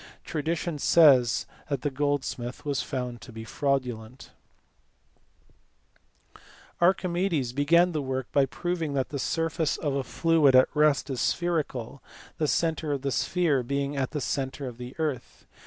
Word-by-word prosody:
Tradition 160 0 -3
says 135 -7 +5 0.2
that 140 -3 -2
the 145 - 0
gold 145 0 0
smith 120 +3 -6
was 145 -2 0
found 125 -4 -4
to - - -11
be 110 0 -8
fraudulent 125 -1 -3 2.0
^/ - - -18 0.4
Archimedes 175 -7 +1
began 170 +6 +4
the 155 -3 -2
work 130 -1 -3
by 140 -1 +3
proving 165 0 -3
that 135 -2 -1
the 140 - -4
surface 165 +3 -1
of 145 -3 -2
a 135 -1 -1
fluid 160 -3 +3
at 130 - +6
rest 150 -2 +3
is 125 -3 -2
spherical, 150 -7 -1 0.4
the 155 - +1
centre 160 -1 0
of 140 -2 -2
the 140 - -1
sphere 160 -3 +1
being 140 +3 -2
at 135 -2 -1
the 150 - -4
centre 135 0 -3
of 125 -2 -7
the 125 +1 -8
earth. 150 -7 -4
140 Hz, 155 wpm, -27 LUFS, 130-160 Hz, 2.0 s, at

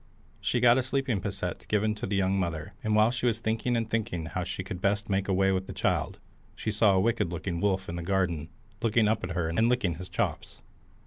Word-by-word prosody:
She 125 - 0
got 120 +1 +6
a - - +3
sleeping 130 -5 -1
posset 95 -3 -4
given 105 +1 +1
to 105 - -5
the 100 - -1
young 95 0 +2
mother, 80 -4 -3
and 110 -1 +1
while 110 +2 +5
she 125 0 -1
was 115 -2 +2
thinking 115 +2 0
and 115 -1 -1
thinking 110 -7 -2
how 90 +2 -3
she 95 - -4
could 95 -2 -6
best 100 +1 0
make 95 0 +1
away 95 0 +3
with 95 0 -1
the - - -6
child, - - 0 0.4
she 110 - -2
saw 105 -1 +4
a - - +4
wicked 110 -4 +1
looking 85 0 -3
wolf 95 -2 +1
in 85 - -4
the - - -3
garden, 85 -4 0 0.3
looking 115 -1 +3
up 110 - +1
at 90 0 -3
her, 85 -2 0
and 100 +9 +2
licking 105 -10 +1
his 90 +1 -8
chops. - - -2
100 Hz, 235 wpm, -28 LUFS, 90-110 Hz, 0.4 s, got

